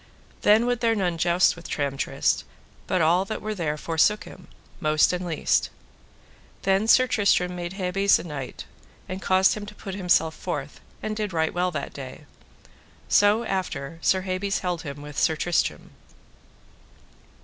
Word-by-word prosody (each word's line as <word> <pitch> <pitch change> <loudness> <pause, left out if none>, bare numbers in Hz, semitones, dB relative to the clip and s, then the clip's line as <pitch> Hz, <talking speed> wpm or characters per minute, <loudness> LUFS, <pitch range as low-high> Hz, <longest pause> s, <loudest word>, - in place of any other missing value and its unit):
Then 215 +3 +5
would 245 -1 0
there 230 -1 +2
none 180 -5 -1
joust 175 +2 +3
with 170 - -11
Tramtrist, 140 -2 0 0.4
but 185 -3 +1
all 175 +4 +4
that 215 - -4 0.2
there 165 -6 -1
were - - -7
forsook 165 +7 +1
him, - - -13 0.3
most 155 +2 +3
and 180 0 -2
least. 165 -4 0 0.9
Then 195 +3 +2
Sir 255 +3 +6
Tristram 200 -7 +2
made 175 0 -5
Hebes 195 +1 +2
a - - -7
knight, 145 -6 -7 0.4
and 185 +1 -5
caused 190 0 +4
him 210 -1 -6
to 210 - -10
put 195 - -7
himself 175 -4 +2
forth, 145 -1 -5 0.2
and 215 0 -2
did 210 -3 -3
right 160 -1 0
well 180 +1 +1
that 145 -5 -5
day. 135 +1 -9 0.8
So 205 +3 +4
after 165 -7 -3
Sir 190 +2 +2
Hebes 190 +1 -2
held 175 -2 -2
him 145 -2 -7
with 150 -1 -5
Sir 160 - +2
Tristram. 175 +2 -1
180 Hz, 160 wpm, -25 LUFS, 160-200 Hz, 0.9 s, Sir